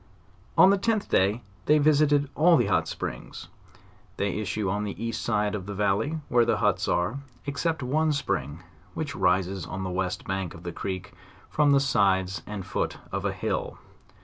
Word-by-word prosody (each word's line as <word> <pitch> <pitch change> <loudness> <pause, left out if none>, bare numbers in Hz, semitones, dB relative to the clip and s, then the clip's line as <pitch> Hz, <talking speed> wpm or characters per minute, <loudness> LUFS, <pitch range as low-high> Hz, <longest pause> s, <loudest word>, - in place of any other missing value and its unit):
On 190 - +8
the 200 - +2
10th 220 0 0
they 100 +6 +1
visited 145 -1 +4
all 165 +4 +5
the 120 - +2
hot - - +1
springs. - - -6 0.7
They 100 0 -1
issue 105 0 -2
on 100 +3 -1
the 100 -2 -5
east 115 0 -3
side 105 -2 0
of 100 -3 -4
the 100 - -5
valley, 105 +11 0
where 120 -1 +4
the - - +1
huts - - +1
are, 90 +10 0 0.3
except 155 +1 -1
one 155 +5 +1
spring, 80 - -2 0.3
which 150 -3 -3
rises 95 +1 +1
on 95 0 -5
the 95 - -3
west 90 0 -2
bank 95 -3 -3
of 85 - -12
the 85 - -4
creek, 95 -2 -5 0.4
from 150 -1 +3
the 140 - +6
sides 95 -8 +2
and 105 -3 -5
foot 95 - -2
of - - -3
a - - +1
hill. - - -3
105 Hz, 175 wpm, -27 LUFS, 95-145 Hz, 0.7 s, On